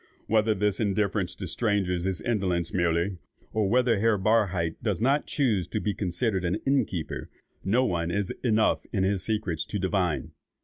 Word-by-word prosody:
Whether 110 0 +2
this 105 0 0
indifference 100 -3 0
to 95 - -6
strangers 95 -3 0
is 95 -2 -1
indolence 90 -7 -1
merely, 85 +1 +1 0.4
or 105 -3 +1
whether 120 -2 +3
Herr 110 0 +3
Barhydt 95 -5 +1
does 105 -6 -1
not 140 +5 +2
choose 110 - +1
to 110 - -2
be 105 0 -1
considered 95 +1 -1
an 90 +1 0
inn 135 0 +3
keeper, 85 -4 -5 0.3
no 120 +7 +2
one 85 -4 -1
is 100 +2 -1
enough 110 -3 +2
in 95 -4 0
his 95 0 +1
secrets 105 -7 -1
to 105 - -3
divine. 95 -4 -1
100 Hz, 170 wpm, -27 LUFS, 90-110 Hz, 0.4 s, whether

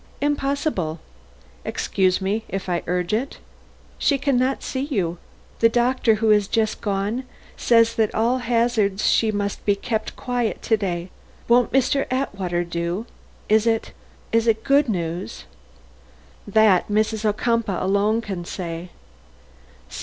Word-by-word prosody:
"Impossible." 280 - -1 0.6
"Excuse 185 -1 0
me, 205 +4 -1
if 195 0 -4
I 175 -2 0
urge 180 +2 -1
it." 250 +6 -1 0.6
"She 280 - +2
can 275 0 0
not 255 +2 +1
see 260 - -3
you. 190 - -2 0.4
The 230 - +5
doctor 240 -1 +2
who 220 +1 +1
has 210 -2 +4
just 220 0 0
gone 205 +4 -1 0.3
says 230 -1 +4
that 220 -2 +3
at - - -11
all 235 +4 +2
hazards 230 -4 +1
she 220 -1 +3
must 205 -1 -3
be 205 - +2
kept 220 +2 -3
quiet 245 -3 -2
to 225 - +3
day. 180 -4 -3 0.4
Won't 245 +1 +4
Mr. 270 +1 +2
Atwater 195 -9 -1
do? 170 +4 -3 0.4
Is 215 +1 +3
it 225 -1 0 0.4
is 230 0 +2
it 220 -1 +2
good 280 -1 +3
news?" 170 - -3 1.0
"That, 205 -3 +4
Mrs. 215 +1 0
Ocumpaugh 215 -2 0
alone 200 +4 +2
can 195 -6 -5
say." 170 -1 -6
215 Hz, 140 wpm, -22 LUFS, 190-240 Hz, 1.0 s, The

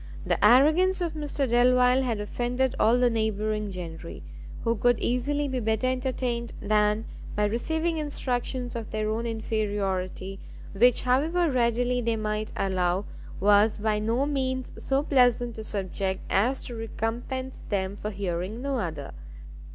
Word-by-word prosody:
The - - 0
arrogance 310 - +5
of 345 -2 -2
Mr 295 -3 -2
Delvile 250 +1 +4
had 235 -5 -1
offended 245 +4 -1
all 230 +3 +4
the 250 0 +4
neighbouring 215 -1 -1
gentry, 160 - -7 0.4
who 230 0 +1
could 245 +1 +2
easily 285 +4 0
be 260 -2 -2
better 220 +1 0
entertained 255 -2 -1
than 210 +1 +1 0.3
by 210 - +2
receiving 320 +10 -1
instructions 255 -4 -3
of 230 -2 -5
their 215 0 -1
own 230 +2 -2
inferiority, 200 -4 -2 0.3
which 240 +4 +4
however 310 +7 +2
readily 245 0 +1
they 230 -1 0
might 215 0 -2
allow, 185 0 0 0.3
was 205 +2 +4
by 210 0 0
no 230 +6 +1
means 260 -3 -2
so 270 +1 +1
pleasant 245 -4 +2
a - - -5
subject 190 -2 -3
as 245 +7 +1
to 245 - -6
recompense 235 +4 -4
them 195 -1 -1
for 210 - -4
hearing 195 +1 -3
no 275 -2 -1
other. 160 -8 -4
230 Hz, 145 wpm, -27 LUFS, 210-255 Hz, 0.4 s, arrogance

